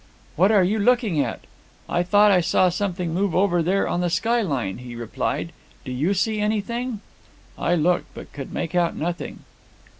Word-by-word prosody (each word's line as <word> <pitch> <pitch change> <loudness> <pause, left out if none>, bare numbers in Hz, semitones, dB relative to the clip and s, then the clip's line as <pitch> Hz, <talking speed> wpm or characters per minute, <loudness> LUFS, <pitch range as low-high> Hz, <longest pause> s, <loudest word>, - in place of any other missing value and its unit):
'What 190 +6 +4
are 205 -4 +5
you 205 +5 +1
looking 220 -6 +2
at?' 120 -5 -3 0.5
'I 175 - 0
thought 205 +3 +4
I 185 -2 +4
saw 180 +2 +3
something 180 -2 -2
move 190 0 0
over 180 -2 +3
there 185 +4 +1
on 175 - -1
the 175 - +1
skyline,' 165 - 0
he 125 -1 -9
replied; 120 -1 -3 0.3
'do - - -5
you 150 +11 0
see 215 +3 0
anything?' 220 +2 -2 0.5
I 175 - +1
looked, 175 +2 +1
but - - -10
could 140 -2 -7
make 165 - -4
out 175 -1 +1
nothing. 170 +2 -4
180 Hz, 175 wpm, -23 LUFS, 165-205 Hz, 0.5 s, are